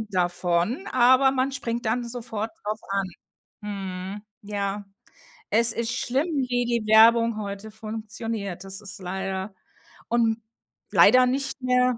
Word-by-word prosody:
davon, 175 - 0
aber 260 +2 +5
man 265 +1 0
springt 235 -3 -3
dann 240 +3 0
sofort 230 -2 -4
drauf 215 +1 -3
an. 195 -1 0 0.6
Mhm. 195 -1 -5 0.2
Ja, 200 0 -3 0.7
es 230 +2 +5
ist 235 +1 -1
schlimm, 265 +5 0 0.2
wie 245 0 +1
die 235 -2 -1
Werbung 230 +1 +6
heute 200 0 -6
funktioniert. 215 -3 -5
Das 195 +1 -7
ist 200 -1 -8
leider 190 +2 -4 0.6
und 230 -1 +1 0.5
leider 255 0 +7
nicht 275 +2 -2
mehr 250 -1 +2
220 Hz, 125 wpm, -25 LUFS, 200-245 Hz, 0.7 s, leider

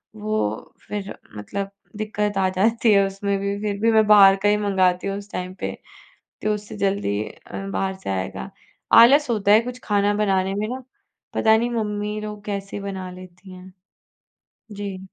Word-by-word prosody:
वो 215 - -3
फिर 205 -1 -5 0.2
मतलब 195 - -5 0.3
दिक्कत 210 -1 -2
आ 190 -1 +3
जाती 225 +4 +2
है 200 0 +5
उसमें 195 +1 -2
भी, 200 0 -2
फिर 205 -1 -2
भी 230 0 +4
मैं 220 -1 +5
बाहर 200 -2 +8
का 205 - +4
ही 210 - +3
मँगाती 190 -3 +1
हूँ 195 0 -2
उस 205 +1 -10
टाइम 185 0 -4
पे, - - -2 0.7
तो 215 0 +1
उससे 210 0 -7
जल्दी 195 - 0
अ, 195 - -9
बाहर 190 -1 -1
से - - -4
आएगा। 95 -7 -3 0.5
आलस 275 +3 +6
होता 205 -3 +2
है 215 - +8
कुछ 250 +1 -7
खाना 205 0 +2
बनाने 195 -2 +1
में 210 +1 -2
ना, 255 +2 -5 0.5
पता 220 0 +4
नहीं 235 +2 0
मम्मी 210 -2 -2
लोग 210 -1 -7
कैसे 200 -1 -4
बना 190 -2 -5
लेती 185 +1 -13
हैं। 185 0 -12 1.0
जी। 200 -2 -5
200 Hz, 175 wpm, -23 LUFS, 190-210 Hz, 1.0 s, बाहर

